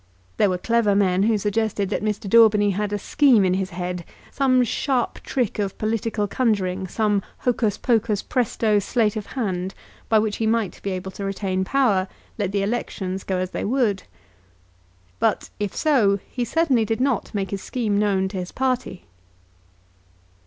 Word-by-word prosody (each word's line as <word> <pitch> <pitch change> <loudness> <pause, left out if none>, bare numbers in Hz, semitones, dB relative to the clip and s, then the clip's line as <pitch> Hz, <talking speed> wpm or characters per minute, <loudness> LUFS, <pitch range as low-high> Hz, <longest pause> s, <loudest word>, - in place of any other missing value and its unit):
There 205 - +4
were 180 - 0
clever 225 0 +2
men 190 -2 +2
who 220 +1 +3
suggested 205 -1 -1
that - - -1
Mr. 210 0 -2
Daubeny 210 -1 +5
had 205 +2 -2
a 205 - 0
scheme 245 -1 +4
in 185 - +2
his 190 0 -1
head 180 0 -4 0.3
some 255 -2 +3
sharp 245 +1 -1
trick 245 -5 -2
of 195 -2 -2
political 220 -1 -1
conjuring, 195 -5 0
some 210 0 +1 0.2
"hocus 225 -4 +1
pocus 225 -4 +1
presto" 225 -3 +1
sleight 210 +1 0
of 215 -2 -5
hand, 190 -5 -2 0.3
by 220 - +5
which 215 -1 0
he 225 - 0
might 220 -4 0
be 200 - -3
able 190 0 -4
to 200 - -7
retain 195 -1 -1
power, 205 -5 +2 0.3
let 200 -2 -1
the 200 0 0
elections 195 -3 -3
go 190 - -2
as 185 0 -2
they - - -3
would. 225 -5 +1 1.2
But, - - 0
if 205 -2 -3
so, 235 -11 +3
he 245 -1 -2
certainly 270 -3 +2
did 220 +2 -1
not 265 -1 0
make 195 -2 -2
his 195 -1 -3
scheme 215 -5 -1
known 195 -2 +1
to 190 - -6
his 180 -1 -4
own - - -19
party. 255 -7 -2
210 Hz, 175 wpm, -23 LUFS, 195-230 Hz, 1.2 s, Daubeny